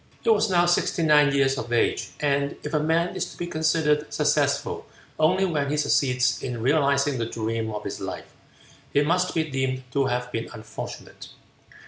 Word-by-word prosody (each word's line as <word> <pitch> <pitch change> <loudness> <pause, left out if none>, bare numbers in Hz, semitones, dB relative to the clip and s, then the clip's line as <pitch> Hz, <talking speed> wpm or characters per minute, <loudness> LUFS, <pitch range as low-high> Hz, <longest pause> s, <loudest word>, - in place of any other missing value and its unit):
He 230 - +4
was 215 0 +3
now 175 -2 +3
sixty 175 -1 +1
nine 150 -2 +5
years 135 -1 +2
of 120 - -6
age, 120 - +1
and 140 -1 0
if 150 - -5
a 150 - +3
man 165 +3 0
is - - -2
to - - -14
be 175 - -3
considered 155 -2 +1
successful 150 -1 0 0.3
only 185 +5 +3
when 150 -6 -1
he 150 - 0
succeeds 130 -3 +1
in 120 -3 -4
realizing 140 -1 +2
the 115 - -1
dream 115 0 -3
of 105 -1 -5
his - - -5
life, - - -7 0.6
he 145 - +3
must 180 +4 0
be 160 - +2
deemed 130 -3 -2
to 140 +1 +1
have 125 0 -2
been 115 -1 -4
unfortunate. 110 0 -9
145 Hz, 180 wpm, -25 LUFS, 130-160 Hz, 0.6 s, nine